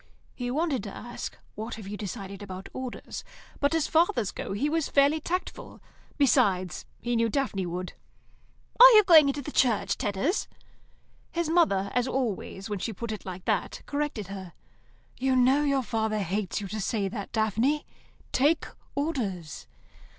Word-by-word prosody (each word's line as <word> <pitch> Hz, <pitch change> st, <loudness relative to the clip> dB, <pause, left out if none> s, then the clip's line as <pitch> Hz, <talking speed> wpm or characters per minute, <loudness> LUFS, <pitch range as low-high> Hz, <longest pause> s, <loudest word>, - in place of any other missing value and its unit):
He 245 Hz, -1 st, -4 dB
wanted 285 Hz, -2 st, 0 dB
to 200 Hz, -, -5 dB
ask, 240 Hz, 0 st, -7 dB, 0.2 s
"What 220 Hz, +3 st, -5 dB
have 215 Hz, -3 st, -9 dB
you 205 Hz, -, -5 dB
decided 200 Hz, -1 st, -6 dB
about 190 Hz, -1 st, -8 dB
Orders?" 255 Hz, -2 st, -6 dB, 0.4 s
but, 285 Hz, +3 st, +2 dB
as 320 Hz, -2 st, +2 dB
fathers 290 Hz, -, +2 dB
go, -, -, -6 dB
he 220 Hz, +9 st, 0 dB
was 320 Hz, 0 st, 0 dB
fairly 285 Hz, +3 st, +4 dB
tactful. 360 Hz, +4 st, -4 dB, 0.4 s
Besides, 185 Hz, -, +2 dB, 0.2 s
he 240 Hz, 0 st, 0 dB
knew 230 Hz, 0 st, +2 dB
Daphne 205 Hz, -8 st, -1 dB
would. 180 Hz, +1 st, -4 dB, 0.9 s
"Are -, -, +12 dB
you 425 Hz, -1 st, +8 dB
going 320 Hz, -6 st, +8 dB
into 280 Hz, +1 st, -1 dB
the 295 Hz, -, -6 dB
Church, 220 Hz, -7 st, +2 dB
Tedders?" 240 Hz, -, 0 dB, 0.9 s
Her 335 Hz, -1 st, 0 dB
mother, 200 Hz, -, +3 dB
as 250 Hz, 0 st, +1 dB
always 225 Hz, -6 st, -2 dB
when 205 Hz, -2 st, -3 dB
she 225 Hz, -, -3 dB
put 230 Hz, +3 st, -5 dB
it 215 Hz, -, -6 dB
like 185 Hz, -1 st, -7 dB
that, -, -, -1 dB
corrected 285 Hz, -7 st, -2 dB
her. 190 Hz, -4 st, -7 dB, 0.7 s
"You 260 Hz, 0 st, +2 dB
know 270 Hz, +2 st, +3 dB
father 220 Hz, -1 st, -1 dB
hates 195 Hz, +3 st, -2 dB
you 200 Hz, -, -5 dB
to 215 Hz, +1 st, -3 dB
say 200 Hz, 0 st, 0 dB
that, 200 Hz, 0 st, -6 dB
Daphne. 225 Hz, +7 st, +1 dB, 0.5 s
Take 300 Hz, +4 st, +3 dB, 0.3 s
Orders." 225 Hz, -, -3 dB
235 Hz, 160 wpm, -28 LUFS, 200-285 Hz, 0.9 s, Are